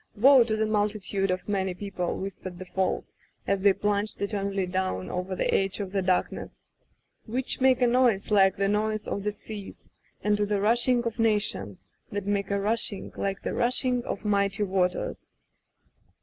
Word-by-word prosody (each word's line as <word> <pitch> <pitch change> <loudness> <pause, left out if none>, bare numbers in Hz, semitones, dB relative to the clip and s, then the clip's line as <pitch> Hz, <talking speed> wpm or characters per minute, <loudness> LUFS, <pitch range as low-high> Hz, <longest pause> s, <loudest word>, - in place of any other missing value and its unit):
^^Woe 260 0 +7
to 220 - 0
the 220 0 +1
multitude 205 -2 0
of 185 0 -2
many 190 -3 -1
people^^ 190 -2 -3
whispered 190 -2 -6
the 185 - -8
Falls, 185 0 -2 0.3
as 195 -1 0
they 200 0 +6
plunged 205 +1 -1
eter 200 0 -2
nally 195 -1 -1
down 180 - -2
over 185 +1 -3
the - - 0
edge 195 +1 +1
of 195 -2 -4
the 195 -1 0
darkness, 185 -1 -1 0.7
^^ - - -9
which 255 +2 -1
make 260 -1 +4
a - - +6
noise 240 -5 +2
like 195 -2 +5
the 195 0 0
noise 215 +1 0
of 200 - -2
the 210 - 0
seas; 205 -1 -10 0.3
and 210 0 +2
to 205 - +1
the 205 -1 0
rushing 240 +3 +3
of 230 0 -4
nations 200 - 0 0.2
y - - -9
that 195 - -11
make 200 -1 -1
a 200 0 0
rushing 210 0 -1
like 195 -1 -3
the - - -2
rushing 250 0 +1
of - - -5
mighty 200 0 +2
waters! 185 -2 -1
200 Hz, 185 wpm, -27 LUFS, 190-215 Hz, 0.7 s, ^^Woe